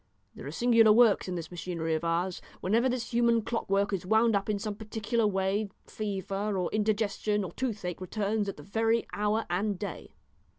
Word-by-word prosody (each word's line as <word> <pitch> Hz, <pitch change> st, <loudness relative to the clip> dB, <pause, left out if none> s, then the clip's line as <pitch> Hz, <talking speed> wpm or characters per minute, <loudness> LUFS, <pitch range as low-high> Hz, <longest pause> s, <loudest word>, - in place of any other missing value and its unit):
There -, -, -9 dB
are -, -, -5 dB
singular 230 Hz, +4 st, +5 dB
works 220 Hz, -3 st, +5 dB
in 180 Hz, -, -3 dB
this 165 Hz, -1 st, -6 dB
machinery 170 Hz, -2 st, -3 dB
of 160 Hz, +1 st, -1 dB
ours. 170 Hz, +2 st, -1 dB, 0.2 s
Whenever 230 Hz, +7 st, +2 dB
this 250 Hz, -1 st, -3 dB
human 235 Hz, -1 st, +3 dB
clockwork 200 Hz, -3 st, 0 dB
is 190 Hz, -, -1 dB
wound 220 Hz, +3 st, +3 dB
up 200 Hz, +1 st, -1 dB
in 210 Hz, -, +1 dB
some 210 Hz, +1 st, -3 dB
particular 220 Hz, +1 st, -1 dB
way, 195 Hz, +1 st, 0 dB, 0.2 s
fever, 200 Hz, 0 st, -3 dB
or 180 Hz, -2 st, -1 dB
indigestion, 210 Hz, -1 st, 0 dB
or 180 Hz, -, -5 dB
toothache 200 Hz, -7 st, -4 dB
returns 205 Hz, +2 st, -1 dB
at -, -, -6 dB
the 150 Hz, -, -10 dB
very 225 Hz, +4 st, +1 dB
hour 210 Hz, +2 st, 0 dB
and 195 Hz, +3 st, -1 dB
day." 200 Hz, +2 st, -7 dB
205 Hz, 180 wpm, -29 LUFS, 190-220 Hz, 0.2 s, singular